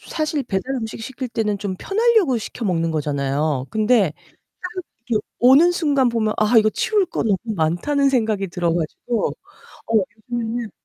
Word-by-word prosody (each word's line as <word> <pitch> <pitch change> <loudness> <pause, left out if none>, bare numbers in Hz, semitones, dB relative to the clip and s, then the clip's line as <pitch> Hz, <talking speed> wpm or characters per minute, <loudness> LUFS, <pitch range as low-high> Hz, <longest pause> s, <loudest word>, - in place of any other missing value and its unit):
사실 310 -2 -2
배달 215 +6 -2
음식 225 -2 -5
시킬 260 +2 -5
때는 215 -3 -1
좀 195 -1 -3
편하려고 425 - +2
시켜 225 +2 -6
먹는 165 -3 0
거잖아요. 145 -2 -1
근데 215 -5 +2 0.5
딱 365 0 -5 0.2
이게 230 -3 +1 0.2
오는 275 +8 +6
순간 285 -7 +2
보면 220 -2 0
'아 215 +2 +3
이거 215 -1 +5
치울 410 - +1
거 - - -3
너무 210 -4 +2 0.2
많다.'는 195 - +1
생각이 220 -6 0
들어 170 -1 -1
가지고 175 +7 -2 0.6
어 225 - -2 0.4
요즘에는 235 -1 -2
225 Hz, 320 characters per minute, -21 LUFS, 190-270 Hz, 0.6 s, 오는